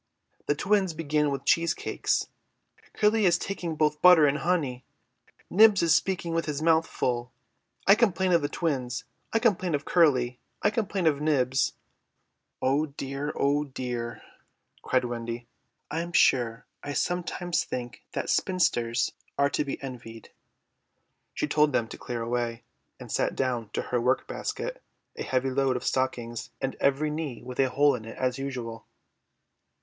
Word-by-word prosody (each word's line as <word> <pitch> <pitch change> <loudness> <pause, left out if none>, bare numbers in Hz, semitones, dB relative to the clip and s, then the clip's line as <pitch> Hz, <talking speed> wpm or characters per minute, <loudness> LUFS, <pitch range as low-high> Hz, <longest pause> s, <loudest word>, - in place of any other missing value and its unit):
"The 145 - +2
twins 195 -2 +1
began 150 -2 +1
with 140 -1 -4
cheese 170 +1 +3
cakes." - - -1 0.7
"Curly 210 -1 +3
is 175 0 +4
taking 175 -4 -4
both 150 -1 +1
butter 180 -4 +8
and 145 +1 +2
honey." 140 -6 0 0.6
"Nibs 210 -1 +6
is 165 -1 +4
speaking 175 -3 0
with 165 0 0
his 150 -2 -2
mouth 165 0 +3
full." 120 0 -2 0.5
"I 195 - +8
complain 190 -4 +2
of 170 -2 +4
the 145 - -1
twins." 135 -8 -2 0.3
"I - - +2
complain 190 -8 +2
of 145 - -4
Curly." 130 -8 +3 0.2
"I 205 - +4
complain 205 -4 -1
of 150 -2 +2
Nibs." 135 -4 +2 0.9
"Oh 140 +4 +2
dear, 140 +1 -4
oh 145 +1 +2
dear," 125 -3 -5 0.6
cried 130 -1 +1
Wendy, 120 0 -4 0.5
"I'm 170 +3 -3
sure 120 -7 +3 0.2
I 145 - -5
sometimes 175 +1 -1
think 120 -1 -6
that - - -2
spinsters 120 -10 +1 0.3
are 140 0 +3
to - - +1
be 140 - -5
envied." 120 -4 -9 1.0
She - - 0
told 150 -2 +2
them 115 - +1
to - - -8
clear 120 -2 -4
away, 120 0 -2 0.4
and - - -9
sat - - 0
down 125 -5 -1
to - - -1
her 125 -1 -1
work 125 +2 +1
basket, - - -4 0.3
a - - -7
heavy 130 0 0
load 135 -1 +1
of - - -7
stockings 120 -3 -2
and 135 0 -2
every 140 +2 +2
knee 150 -5 -4
with 125 0 -8
a 135 -1 +4
hole 145 +2 +4
in 115 -4 -5
it 115 - -9
as 130 0 -1
usual. 125 -4 -5
140 Hz, 155 wpm, -27 LUFS, 125-170 Hz, 1.0 s, butter